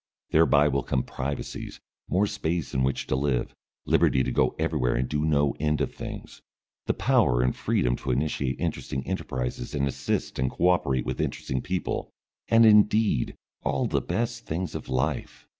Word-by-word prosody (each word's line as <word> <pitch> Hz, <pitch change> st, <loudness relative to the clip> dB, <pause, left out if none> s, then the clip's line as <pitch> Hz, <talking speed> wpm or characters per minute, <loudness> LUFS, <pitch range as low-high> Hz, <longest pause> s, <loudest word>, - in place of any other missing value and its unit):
Thereby 75 Hz, -2 st, +5 dB
will 70 Hz, -1 st, +1 dB
come 65 Hz, 0 st, -1 dB
privacies, 70 Hz, +2 st, -5 dB, 0.3 s
more 95 Hz, +3 st, +3 dB
space 90 Hz, -5 st, -2 dB
in 65 Hz, -, +1 dB
which 65 Hz, +1 st, 0 dB
to -, -, 0 dB
live, 65 Hz, -2 st, 0 dB, 0.3 s
liberty 65 Hz, -, +3 dB
to 65 Hz, -, -2 dB
go -, -, +2 dB
everywhere 75 Hz, -6 st, 0 dB
and 65 Hz, +1 st, 0 dB
do 75 Hz, 0 st, -1 dB
no 75 Hz, -2 st, +2 dB
end 75 Hz, +1 st, +1 dB
of -, -, -1 dB
things, -, -, -8 dB, 0.5 s
the -, -, +2 dB
power -, -, +3 dB
and 65 Hz, -, +1 dB
freedom -, -, +1 dB
to 65 Hz, -, -6 dB
initiate 65 Hz, -1 st, -1 dB
interesting 65 Hz, 0 st, -3 dB
enterprises 60 Hz, +1 st, -3 dB
and 70 Hz, -1 st, +1 dB
assist 70 Hz, -, -2 dB
and 65 Hz, 0 st, +1 dB
co 90 Hz, -, +2 dB
operate 70 Hz, -8 st, +1 dB
with -, -, -2 dB
interesting 65 Hz, -1 st, -2 dB
people, 90 Hz, 0 st, -3 dB, 0.4 s
and 115 Hz, 0 st, +6 dB
indeed 105 Hz, -, +4 dB, 0.3 s
all -, -, 0 dB
the -, -, 0 dB
best 120 Hz, +1 st, -3 dB
things 85 Hz, +1 st, -3 dB
of -, -, -6 dB
life. 65 Hz, -1 st, -2 dB
70 Hz, 170 wpm, -26 LUFS, 65-85 Hz, 0.5 s, and